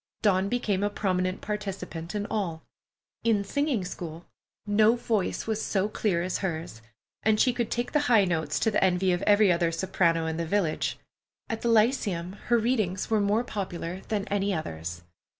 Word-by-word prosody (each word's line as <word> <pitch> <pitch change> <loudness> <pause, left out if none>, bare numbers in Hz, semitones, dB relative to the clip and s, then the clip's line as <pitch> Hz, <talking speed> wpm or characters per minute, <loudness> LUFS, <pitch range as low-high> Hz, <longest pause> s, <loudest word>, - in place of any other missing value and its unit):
Dawn 195 -2 +3
became 210 -5 0
a 205 - +1
prominent 185 -2 -1
participant 195 -4 -5
at 205 0 -1
all. 170 -7 -2 0.6
In 220 -3 +2
singing 275 -2 0
school, 170 -2 -7 0.4
no 215 +2 +4
voice 225 -5 -1
was 220 -1 -1
so 195 0 +1
clear 200 -5 0
as 185 - -2
hers, 160 - -4 0.4
and 215 -1 +2
she 250 - +4
could 235 -2 -1
take 240 0 -2
the 300 - +3
high 220 -5 +6
notes 165 -3 -1
to 220 - +2
the 205 - +2
envy 185 0 +3
of 175 0 0
every 205 -2 +6
other 170 -1 +2
soprano 165 -1 +1
in 160 0 -2
the 170 -1 -2
village. 175 -4 0 0.5
At 225 0 -3
the 235 - 0
Lyceum 210 -6 +2
her 240 - +4
readings 215 -5 0
were 215 -2 +3
more 205 +4 +2
popular 185 -5 -4
than 205 -2 -2
any 200 -1 0
others. 85 - -5
195 Hz, 175 wpm, -27 LUFS, 175-215 Hz, 0.6 s, high